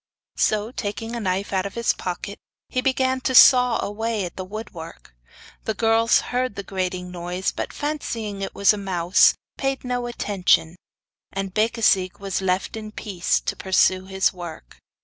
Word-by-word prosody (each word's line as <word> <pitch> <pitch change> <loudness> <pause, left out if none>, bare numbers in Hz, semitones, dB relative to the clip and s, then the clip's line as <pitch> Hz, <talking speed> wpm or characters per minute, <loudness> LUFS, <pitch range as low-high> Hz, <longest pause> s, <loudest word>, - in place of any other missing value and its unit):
So, 215 +1 +1
taking 225 0 -4
a - - -3
knife 195 -1 -2
out 190 0 +1
of 200 - -11
his 235 -1 +1
pocket, 185 +3 -5 0.3
he 255 - -1
began 260 0 +1
to 260 0 -1
saw 250 0 +7
away 215 -1 -2
the 185 - -7
woodwork. 180 - -9 0.5
The 220 - -1
girls 225 +1 +3
heard 250 -3 0
the 200 - -5
grating 185 -2 -3
noise, 180 +1 -3
but - - -5
fancying 230 -9 -4
it 195 - -5
was 200 +1 +5
a 210 - -4
mouse, 180 -2 +4 0.2
paid 270 -1 -1
no 245 -1 -2
attention, 190 -7 +1 0.6
and 195 -1 -4
Becasigue 215 -4 +2
was 195 -1 -3
left 185 +2 -1
in 215 -1 -7
peace 195 -4 -1
to - - -3
pursue 185 0 +2
his 190 0 +1
work. 170 - -10
200 Hz, 160 wpm, -23 LUFS, 185-230 Hz, 0.6 s, saw